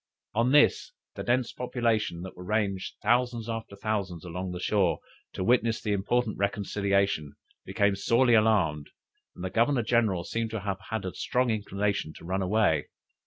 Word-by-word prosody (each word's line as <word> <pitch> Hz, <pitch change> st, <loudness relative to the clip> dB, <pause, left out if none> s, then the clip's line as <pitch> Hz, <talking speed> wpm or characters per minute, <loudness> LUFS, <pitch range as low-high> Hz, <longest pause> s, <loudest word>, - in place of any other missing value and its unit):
On 115 Hz, +3 st, +2 dB
this 150 Hz, -, +4 dB, 0.2 s
the -, -, -6 dB
dense 125 Hz, 0 st, +1 dB
population 110 Hz, -8 st, -1 dB
that 95 Hz, -, -8 dB
were 90 Hz, -, -9 dB
ranged 100 Hz, -2 st, -1 dB
thousands 120 Hz, 0 st, +1 dB
after 115 Hz, -3 st, -5 dB
thousands 100 Hz, -5 st, -3 dB
along 90 Hz, +1 st, -4 dB
the 90 Hz, -, -5 dB
shore, 95 Hz, -2 st, +2 dB, 0.4 s
to -, -, -3 dB
witness 115 Hz, +1 st, +2 dB
the 110 Hz, -3 st, -3 dB
important 105 Hz, +3 st, 0 dB
reconciliation, 100 Hz, -6 st, 0 dB, 0.3 s
became 100 Hz, +1 st, +1 dB
sorely 120 Hz, +5 st, +3 dB
alarmed, 100 Hz, -10 st, +3 dB, 0.5 s
and -, -, -8 dB
the 95 Hz, -, -3 dB
Governor 120 Hz, +4 st, +2 dB
general 110 Hz, -6 st, +2 dB
seems 115 Hz, +3 st, -2 dB
to 110 Hz, -, -2 dB
have 95 Hz, -1 st, -3 dB
had 110 Hz, -3 st, -3 dB
a 95 Hz, -, -4 dB
strong 125 Hz, -1 st, 0 dB
inclination 100 Hz, -5 st, -1 dB
to -, -, -12 dB
run 95 Hz, +2 st, -1 dB
away. 95 Hz, -5 st, +2 dB
105 Hz, 165 wpm, -28 LUFS, 95-115 Hz, 0.5 s, this